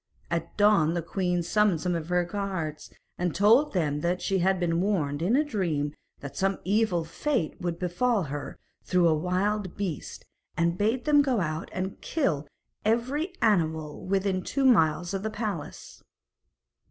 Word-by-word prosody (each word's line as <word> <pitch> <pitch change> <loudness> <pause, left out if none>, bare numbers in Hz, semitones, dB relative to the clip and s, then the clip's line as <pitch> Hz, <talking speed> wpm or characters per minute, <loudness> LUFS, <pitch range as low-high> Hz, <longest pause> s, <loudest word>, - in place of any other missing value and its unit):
At 170 -1 -3
dawn 205 -6 +4
the 170 - -1
queen 180 0 -1
summoned 205 -2 +2
some 180 -1 0
of 165 -1 -3
her 180 0 +2
guards, 175 -5 -4 0.3
and 175 -2 -1
told 225 - +4
them 150 -6 0
that 175 +2 0
she 195 -1 0
had 190 +1 +2
been 170 -1 +1
warned 155 -8 0
in 195 +8 +2
a 295 - +4
dream 165 - -1 0.3
that 140 - -8
some 195 0 0
evil 195 -4 +1
fate 185 - -2
would 175 -1 -2
befall 190 +5 +1
her 145 -1 -6 0.3
through 180 -2 +3
a 160 - +4
wild 185 +4 -1
beast, 185 -7 -5 0.3
and 170 0 +2
bade 225 +6 0
them 295 -1 +5
go 265 -5 +1
out 155 -2 -3
and 190 +1 -4
kill 160 - -1 0.4
every 255 - 0
animal 160 -7 +1
within 190 0 0
two 270 +8 -1
miles 175 -6 +3
of 195 - -2
the 220 - -2
palace. 210 -8 -5
185 Hz, 165 wpm, -27 LUFS, 165-210 Hz, 0.4 s, them